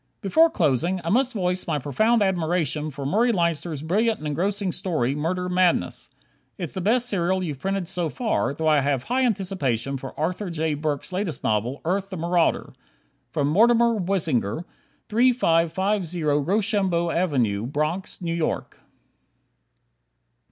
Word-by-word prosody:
Before 320 - +4
closing, 170 - +1
I 165 - -2
must 255 +3 +2
voice 180 -3 -1
my 155 -3 0
profound 215 - +2
admiration 165 -5 0
for 140 -1 -7
Murray 225 - +2
Leinster's 170 -5 -1
brilliant 215 +7 +1
and 155 - -9
engrossing 190 +6 -1
story, 155 -9 -1
"Murder 175 +5 -2
Madness." 175 - +1 0.5
It's 170 -5 -5
the 190 - -4
best 235 +6 +2
serial 185 -3 0
you've 150 -6 -4
printed 195 +2 -2
so 175 -2 -2
far; 220 - -1
though 160 +3 -2
I 155 -2 +5
have 135 -2 0
high 255 +3 0
anticipation 145 - -1
for 135 +2 -9
Arthur 180 +5 -2
J. 160 -2 -1
Burks' 150 +3 -3
latest 180 -7 -3
novel, 110 +6 -1
"Earth, 195 +3 -1
the 190 - -6
Marauder." 170 +1 0 0.6
Mortimer 230 +11 +4
Weisinger, 165 - -1 0.4
3550 190 -6 +1
Rochambeau 175 +3 +1
Ave., 135 - +1
Bronx, 155 +7 -3
New 165 -1 -1
York. 165 -2 -3
175 Hz, 135 wpm, -24 LUFS, 150-195 Hz, 0.6 s, I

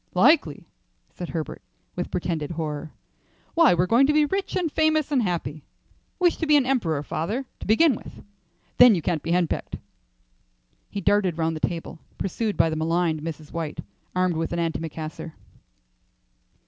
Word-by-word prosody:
"Likely," 280 - +3 0.5
said 175 - -6
Herbert, 160 -2 -5 0.3
with 180 - -3
pretended 165 -4 -2
horror. 155 -2 -4 0.6
"Why, 330 - +5
we're 175 +1 +2
going 240 +7 +4
to 300 - +3
be 300 0 +4
rich, 385 +5 -2
and 335 -4 0
famous 310 -1 +2
and 270 -4 +3
happy. 160 - -3 0.5
Wish 355 -2 +2
to 320 - -2
be 300 -1 +6
an 275 - +2
emperor, 175 - 0
father, 210 - -3
to - - -8
begin 270 +8 +5
with; - - -10 0.5
then 245 -3 +8
you 170 - -3
can't 165 -2 0
be 165 - -6
henpecked." 175 -2 0 1.1
He 200 - -4
darted 190 -3 +2
round 160 0 0
the - - -5
table, 165 -1 -6 0.2
pursued 210 +3 -2
by 165 - +3
the - - -1
maligned 160 0 0
Mrs. 155 -1 -7
White 165 -3 -4 0.4
armed 180 -2 +1
with 165 0 -2
an 170 - -2
antimacassar. 160 -1 -4
175 Hz, 160 wpm, -24 LUFS, 160-255 Hz, 1.1 s, then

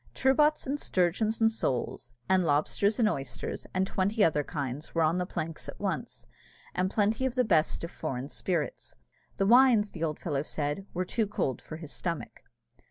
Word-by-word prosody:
Turbots, 300 +3 +3
and 280 +2 -2
sturgeons, 195 - +1
and 225 0 +5
soles, 120 - -3
and 190 -1 +4
lobsters, 165 +7 +2
and 230 -3 +4
oysters, 135 -10 -4
and 185 +1 +1
twenty 200 +3 +1
other 150 -2 +3
kinds, 140 +3 -5
were 165 - +3
on 160 +3 +2
the 180 - -1
planks 165 -3 -4
at - - -9
once, - - -3 0.5
and 185 +1 +1
plenty 215 +4 +1
of 255 - -5
the 250 - +3
best 165 -9 +2
of 170 - -4
foreign 135 -4 -4
spirits. 165 0 -3 0.4
The 195 - +2
wines, 235 -2 +6
the 165 - -5
old 155 -2 -1
fellow 145 -5 -2
said, 150 +5 -3
were 185 +1 0
too 220 +3 0
cold 140 -10 -2
for 155 - -8
his 160 -3 -8
stomach. 170 -3 -4
180 Hz, 180 wpm, -29 LUFS, 155-215 Hz, 0.5 s, wines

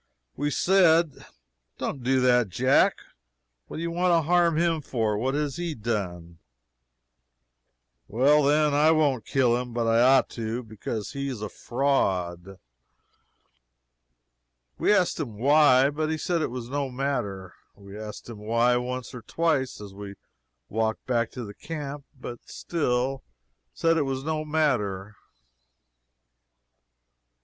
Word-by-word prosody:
We 145 - -1
said: 170 -3 +3 0.5
"Don't 135 - -4
do 130 +1 +2
that, 125 -4 +3
Jack. 130 +9 +3 0.7
What - - -8
do 165 - -4
you 170 - -2
want 180 +2 +1
to 165 -1 +3
harm 170 -2 +3
him 165 -1 +1
for? 110 -6 -1
What 130 +6 -1
has 145 -2 -2
he 170 -3 -3
done?" 90 -7 -4 1.7
"Well, 140 +6 +4
then, 150 +1 +3
I 150 +2 +4
won't 145 -8 +2
kill 125 -3 +2
him, 125 -1 -5
but 120 -1 0
I 115 +1 +3
ought 130 +1 +5
to, 115 +1 -4
because 110 0 -6
he 140 0 -4
is 120 -5 -5
a 105 - -4
fraud." 95 -10 -1 2.2
We - - +3
asked 185 -5 +2
him 120 -9 -5
why, 140 +1 +5
but 155 +1 -2
he 160 - -1
said 170 +1 -1
it - - -1
was 120 -1 -6
no 140 +1 -2
matter. 105 -9 -3 0.2
We 100 0 -13
asked 105 0 -8
him 115 -3 -9
why, 115 +3 +2
once 125 -1 -4
or 125 - -8
twice, 145 0 -1
as 100 -2 -10
we 100 0 -9 0.5
walked 110 0 -2
back 120 -2 0
to 125 -3 -6
the 100 - -9
camp 145 0 -7
but 120 -1 -7
he - - -36
still 135 -4 -1 0.5
said 165 0 +1
it - - +2
was 135 0 -3
no 155 0 -2
matter. 110 -11 -1
130 Hz, 145 wpm, -26 LUFS, 110-150 Hz, 2.2 s, ought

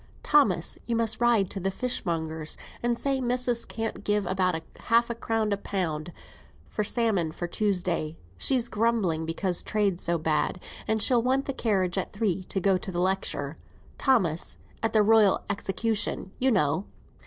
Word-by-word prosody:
"Thomas, 210 - +3
you 235 - 0
must 225 0 +1
ride 235 -5 +3
to 195 - -3
the 190 +1 0
fishmonger's, 165 -9 -2 0.2
and 240 0 0
say 270 0 0
missis 245 -1 +1
can't 225 -1 -4
give 205 -1 +1
above 185 -1 +1 0.2
half 235 0 +2
a - - 0
crown 225 -2 -1
a 200 - +1
pound 175 -5 -3 0.6
for 210 - -2
salmon 205 -7 +1
for 175 - -5
Tuesday; 175 -5 -1 0.2
she's 245 - +2
grumbling 210 -9 0
because 175 +2 +1
trade's 200 -4 0
so 170 0 +1
bad. 160 +3 0 0.3
And 220 -1 +3
she'll 245 -2 +4
want 260 +3 +1
the 275 - -2
carriage 195 -6 0
at - - -5
three 195 -4 -1
to 195 - 0
go 190 0 +2
to 190 - -5
the 175 - -3
lecture, 180 -6 -1 0.4
Thomas; 185 - +2 0.2
at 225 - +1
the 215 -1 +4
Royal 215 -2 +5
Execution, 205 -1 -1
you 265 - +3
know." 185 - +1
200 Hz, 165 wpm, -27 LUFS, 175-230 Hz, 0.6 s, Royal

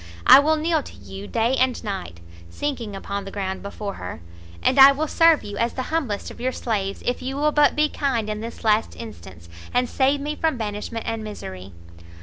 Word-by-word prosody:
I - - +10
will 310 +2 +3
kneel 315 0 +1
to - - -12
you 95 +1 -9
day 230 +3 +1
and 255 -1 +1
night," 190 - -5 0.3
sinking 235 - -4
upon 200 +1 -4
the 195 - -7
ground 190 -1 -4
before 200 0 -5
her, 90 -4 -6 0.4
"and 265 - +3
I 270 +1 +11
will 290 +3 -1
serve 330 0 +4
you 205 0 -7
as 235 +1 0
the 255 - -3
humblest 255 -11 -2
of - - -12
your 255 +1 0
slaves, 200 -6 -3
if 245 - -1
you 265 +1 -4
will 300 +1 +2
but 295 -1 +4
be 300 0 +3
kind 265 -7 -1
in 215 0 -3
this 230 +2 -8
last 215 0 +2
instance, 95 - -10 0.2
and 250 0 +1
save 275 +3 +2
me 295 +2 -3
from 315 -3 0
banishment 215 +1 -4
and 225 -1 -2
misery!" 95 - -8
230 Hz, 205 wpm, -23 LUFS, 200-275 Hz, 0.4 s, I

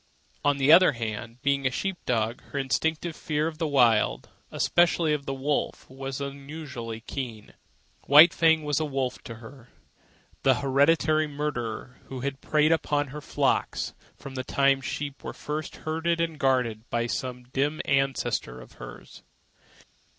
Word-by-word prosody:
On 145 -1 +3
the 140 +2 +4
other 170 -2 +8
hand, 115 +1 -5
being 140 -1 +2
a - - +2
sheep 195 +9 -2
dog, 115 -1 0
her - - -7
instinctive 160 +5 -1
fear 155 -3 -1
of 160 -1 -4
the 165 - 0
Wild, 120 - +3 0.2
and - - -9
especially 170 -2 +3
of 145 -2 -3
the 135 - -1
wolf, 140 +2 -2
was 135 0 -5
unusually 140 -5 -6
keen. 115 -4 -6 0.5
White 155 +5 +9
Fang 160 -1 +3
was 145 -2 0
to 155 - +1
her - - -6
a - - -12
wolf, 135 -2 -2 1.2
the - - +4
hereditary 155 +3 +3
marauder 130 -4 -4
who 130 -2 -7
had 140 +1 -4
preyed 155 +1 +2
upon 145 -3 +1
her 150 +2 -7
flocks - - 0 0.2
from 140 -1 -9
the 130 -1 -3
time 135 +1 +2
sheep 140 +1 -5
were - - -5
first 150 +1 -5
herded 165 +2 -1
and 165 -2 -1
guarded 125 -5 0
by 120 0 0
some 125 +1 -4
dim 145 +3 0
ancestor 130 - 0
of - - -13
hers. - - -11
140 Hz, 160 wpm, -27 LUFS, 130-155 Hz, 1.2 s, White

